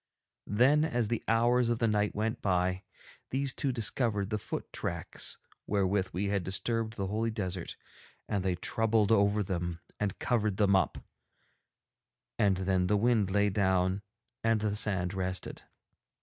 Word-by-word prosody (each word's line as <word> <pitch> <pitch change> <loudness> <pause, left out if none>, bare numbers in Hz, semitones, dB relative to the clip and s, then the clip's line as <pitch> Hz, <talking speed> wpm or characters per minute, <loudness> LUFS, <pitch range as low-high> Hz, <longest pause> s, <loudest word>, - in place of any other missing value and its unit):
Then, 130 +8 +4
as 120 -9 0
the 115 - -1
hours 120 +2 +3
of 120 - +1
the 115 - +1
night 105 -1 +1
went 110 +3 -1
by, 90 -1 +1 0.5
these 135 0 -1
two 140 -2 -1
discovered 110 -3 0
the 105 - 0
foot - - -6
tracks - - -3 0.3
wherewith 100 -1 +1
we 95 +3 -2
had 100 -2 0
disturbed 110 +4 -2
the 100 - -2
holy 110 +4 -1
desert, 95 -5 -4 0.5
and 100 -3 -1
they 95 -2 +1
troubled 110 +3 +1
over 105 -1 +3
them 85 -2 -3 0.2
and 105 -2 -1
covered 110 -5 0
them 100 -2 +4
up; 95 -5 +1 1.4
and 100 -3 +3
then 95 -1 +1
the 105 +2 +3
wind 110 -2 +2
lay 100 +1 +2
down 95 -1 +1 0.4
and 115 -1 +2
the 105 -1 0
sand 95 -3 +1
rested. 95 -1 -3
105 Hz, 150 wpm, -30 LUFS, 95-115 Hz, 1.4 s, Then